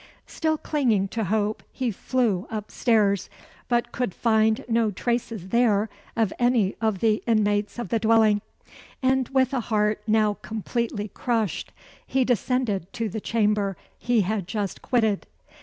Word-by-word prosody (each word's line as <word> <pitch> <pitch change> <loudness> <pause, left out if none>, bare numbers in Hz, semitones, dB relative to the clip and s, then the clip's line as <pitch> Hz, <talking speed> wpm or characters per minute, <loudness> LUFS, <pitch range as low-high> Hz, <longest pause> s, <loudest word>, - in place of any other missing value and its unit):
Still 315 -1 -1
clinging 235 -12 +1
to 225 0 -2
hope, 210 +2 0
he 255 -3 -2
flew 215 -3 0
up 215 -2 -5
stairs, 205 -5 +2 0.4
but 240 -1 0
could 245 -7 -2
find 220 +2 +2
no 230 -2 +2
traces 225 -2 -2
there 225 -3 +2 0.2
of 225 -4 +1
any 240 -5 +2
of 220 -4 0
the 220 -1 +2
inmates 210 -2 +1
of 240 - -4
the 230 - +1
dwelling; 220 -2 +4 0.6
and 260 -1 +2
with 265 0 +2
a 265 - +1
heart 210 -2 0
now 215 -1 +2
completely 220 -1 -3
crushed, 225 -3 -2 0.4
he 265 -1 +2
descended 240 -6 0
to 225 -2 -2
the 215 +3 -5
chamber 210 -4 +1 0.2
he 240 -2 +2
had 200 -1 -2
just 205 -2 -3
quitted. 220 -5 +1
220 Hz, 145 wpm, -25 LUFS, 205-240 Hz, 0.6 s, dwelling